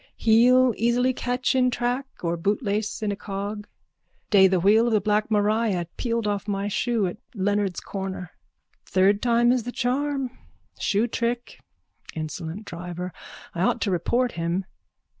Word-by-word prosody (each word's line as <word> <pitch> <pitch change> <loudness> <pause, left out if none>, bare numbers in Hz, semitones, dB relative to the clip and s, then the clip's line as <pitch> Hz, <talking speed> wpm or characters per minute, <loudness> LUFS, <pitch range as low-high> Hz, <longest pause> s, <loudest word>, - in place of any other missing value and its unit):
Heel 245 +3 +5
easily 245 +3 +2
catch 250 0 -1
in 255 -1 +3
track 245 +2 -1 0.2
or 170 0 0
bootlace 205 +4 -1
in 210 - 0
a - - -2
cog. 205 +1 -5 0.6
Day 195 -2 +7
the 185 -1 +2
wheel 215 +6 +4
of 235 - +1
the 215 - +4
black 210 +2 +1
Maria 210 -3 +1
peeled 230 -2 -1
off 205 0 -2
my 200 0 -1
shoe 225 +1 0
at 180 +2 -4 0.2
Leonard's 200 -2 0
corner. 190 -3 -5 0.5
Third 195 +2 +2
time 240 0 +3
is 250 -1 +2
the 245 +2 -5
charm. 265 +1 -1 0.4
Shoe 210 +3 +1
trick. 240 +1 -3 0.6
Insolent 160 +5 -5
driver. 180 0 -6 0.4
I 170 - -3
ought 190 - +2
to 200 - 0
report 240 +7 +1
him. 170 +3 -2
210 Hz, 150 wpm, -25 LUFS, 190-240 Hz, 0.6 s, Day